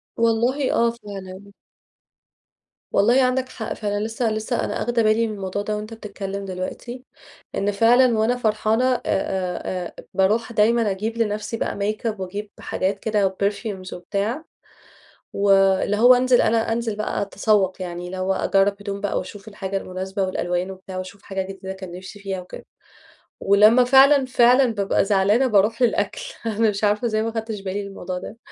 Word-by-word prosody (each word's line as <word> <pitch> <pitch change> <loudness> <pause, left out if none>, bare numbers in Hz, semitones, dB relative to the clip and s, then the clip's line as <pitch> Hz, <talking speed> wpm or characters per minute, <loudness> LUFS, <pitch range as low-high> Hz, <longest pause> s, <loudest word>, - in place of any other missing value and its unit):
والله، 235 +4 +1
آه 235 0 +3
فعلًا. 200 -3 -10 1.4
والله 240 +6 +4
عندك 255 0 0
حق 220 -1 -5
فعلًا، 205 -1 -2
لسه 225 0 -1
لسه 220 +3 -2
أنا - - -3
آخده 235 -1 +1
بالي 220 +1 +3
من 215 - -4
الموضوع 195 0 -4
ده 210 +1 -2
وأنت 215 +2 -7
بتتكلم 200 -2 -6
دلوقتي، 195 +7 -6 0.5
إن 205 +1 0
فعلًا 235 +3 +4
وأنا 225 +3 +2
فرحانة 220 +1 +1
آآ، - - -2
آآ، 185 -2 -2
آآ، - - -12
باروح 210 +5 +1
دايمًا 225 0 +3
أجيب 220 +4 -3
لنفسي 215 0 -2
بقى - - -2
ميك 210 +3 -3
أب، 215 -3 -2
وأجيب 200 +3 -5
حاجات 195 +1 -2
كده 200 -4 0
perfumes 200 -2 -3
وبتاع، 205 - -3 0.9
واللي 195 0 +3
هو 245 +4 +7
أنزل، 250 0 +4
أنا 225 0 +1
أنزل 230 -2 -2
بقى 215 -1 -2
أتسوق، 200 -2 +1
يعني 175 0 -5
اللي 185 +1 -6
هو 190 +1 0
أجرب 195 +1 +2
هدوم 200 0 -5
بقى 205 - -1
وأشوف 195 +2 -7
الحاجة 195 -2 -4
المناسبة 190 +1 -4
والألوان 180 0 -2
وبتاع، 190 0 -9
وأشوف 185 +2 -7
حاجة 195 -1 -3
جديدة 190 0 -6
كان 190 -2 -9
نفسي 185 +3 -10
فيها 195 -2 -4
وكده، 180 - -11 0.7
ولمّا 215 +5 +5
فعلًا، 270 +2 +6
فعلًا 250 0 +4
بأبقى 200 -1 +1
زعلانة 205 +6 +3
باروح 215 +1 +2
للأكل، 245 - +1 0.2
أنا 225 0 +2
مش 205 +1 -4
عارفة 210 +3 +2
إزاي 215 -1 0
ما 225 - -1
أخدتش 220 -2 -4
بالي 195 +1 -3
من - - -7
الموضوع 185 -2 -6
ده، 215 +4 -9
205 Hz, 165 wpm, -22 LUFS, 195-230 Hz, 1.4 s, هو